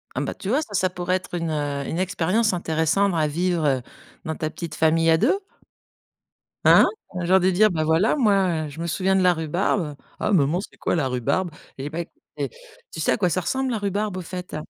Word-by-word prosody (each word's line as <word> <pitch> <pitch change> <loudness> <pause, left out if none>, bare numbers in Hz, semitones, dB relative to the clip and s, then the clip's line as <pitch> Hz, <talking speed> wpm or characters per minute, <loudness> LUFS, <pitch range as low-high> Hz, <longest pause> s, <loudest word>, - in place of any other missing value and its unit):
Ah - - -1
ben, - - -3
tu 190 - -7
vois, 270 +6 +3
ça, 220 -10 -8
ça 185 -1 +2
pourrait 180 0 -2
être 185 - -8
une, 165 -2 -2
heu, 145 -2 -2
une 165 - -3
expérience 185 +4 +1
intéressante 170 +2 +1
à 155 -1 +2
vivre, 170 +2 0
heu, 135 -3 +1 0.4
dans 160 - -2
ta 155 0 -3
petite 165 -2 -7
famille 165 +1 +3
à 160 - +5
2? 270 - +2 1.3
Hein? - - +7 0.3
Un 180 -1 -3
genre 190 +2 +4
de 185 +1 +3
dire: 215 +4 +4
«Bah 160 -4 -1
voilà, 160 +7 +3
moi, 195 - +2
heu, - - -6
je 145 +3 -9
me 170 - -2
souviens 190 +4 +1
de 190 - +3
la 180 -1 +5
rhubarbe». 160 0 -1 0.3
«Ah 215 - +1
maman, 165 -1 +3
c'est 200 - -11
quoi - - 0
la 150 -6 +1
rhubarbe?» 130 +9 -1 0.3
Eh 140 +2 -4
ben, 170 +2 -4 0.3
é - - -2 0.4
tu - - -6
sais - - +2
à - - +3
quoi 190 -5 +1
ça 185 - 0
ressemble 265 +8 -1
la 225 - -1
rhubarbe, 205 0 -2
au 185 - -3
fait? 180 +1 -7
175 Hz, 230 wpm, -23 LUFS, 160-190 Hz, 1.3 s, Hein